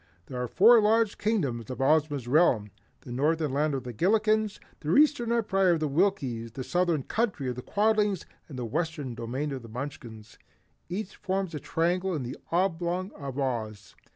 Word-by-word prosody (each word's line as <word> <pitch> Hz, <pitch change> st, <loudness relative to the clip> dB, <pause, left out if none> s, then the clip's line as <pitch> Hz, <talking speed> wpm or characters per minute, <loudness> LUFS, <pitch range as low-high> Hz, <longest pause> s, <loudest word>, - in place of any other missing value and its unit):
There 125 Hz, -1 st, -5 dB
are 125 Hz, -, -2 dB
four 225 Hz, -, +6 dB
large 220 Hz, 0 st, +2 dB
Kingdoms 140 Hz, -, -1 dB
in 130 Hz, -, -6 dB
Ozma's 145 Hz, -2 st, +2 dB
realm, 125 Hz, -, +3 dB, 0.3 s
the -, -, -10 dB
Northern 150 Hz, +3 st, 0 dB
Land 150 Hz, +1 st, +1 dB
of 130 Hz, -, -4 dB
the 125 Hz, -1 st, -6 dB
Gillikens, 215 Hz, -, +2 dB, 0.2 s
the 155 Hz, +2 st, 0 dB
Eastern 285 Hz, -6 st, +4 dB
Empire 195 Hz, -6 st, +2 dB
of 165 Hz, -, 0 dB
the 155 Hz, -, 0 dB
Winkies, 135 Hz, -, 0 dB
the 130 Hz, -, -5 dB
Southern 175 Hz, -2 st, +1 dB
Country 210 Hz, -, -1 dB
of -, -, -2 dB
the 125 Hz, -, -6 dB
Quadlings 210 Hz, -, +1 dB, 0.2 s
and 135 Hz, -, -8 dB
the 125 Hz, -, -3 dB
Western 150 Hz, 0 st, -3 dB
domain 125 Hz, +6 st, -3 dB
of 135 Hz, -2 st, -4 dB
the 115 Hz, -, -12 dB
Munchkins. 115 Hz, -3 st, -8 dB, 0.5 s
Each 195 Hz, +2 st, -4 dB
forms 190 Hz, -2 st, -2 dB
a 150 Hz, -, -3 dB
triangle 175 Hz, +4 st, 0 dB
in 145 Hz, -, -3 dB
the 125 Hz, +1 st, -5 dB, 0.2 s
oblong 180 Hz, +1 st, 0 dB
of 140 Hz, -2 st, -7 dB
Oz. 110 Hz, -7 st, -3 dB
155 Hz, 180 wpm, -28 LUFS, 130-195 Hz, 0.5 s, four